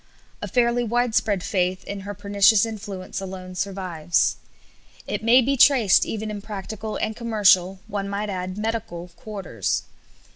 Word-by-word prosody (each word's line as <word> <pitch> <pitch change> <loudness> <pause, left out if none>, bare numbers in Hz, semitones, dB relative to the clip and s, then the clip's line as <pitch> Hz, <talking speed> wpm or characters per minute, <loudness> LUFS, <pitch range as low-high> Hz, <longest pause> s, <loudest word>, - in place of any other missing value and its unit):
A - - -3
fairly 240 -1 +2
widespread 225 -4 +1
faith 185 -1 -1
in 200 - -6
her 200 +1 -7
pernicious 200 +2 +4
influence 200 -4 -6
alone 185 -1 -7
survives. 180 -3 -1 0.7
It - - -4
may 245 +3 +6
be 275 +3 +1
traced 245 -7 +5
even 215 0 -4
in 205 -1 -6
practical 215 +1 -6
and 220 - -2
commercial 195 -5 +3
one 200 -1 -4
might 205 +1 -3
add, 185 0 -4
medical 215 -6 -4
quarters. 195 - -3
205 Hz, 140 wpm, -23 LUFS, 185-220 Hz, 0.7 s, may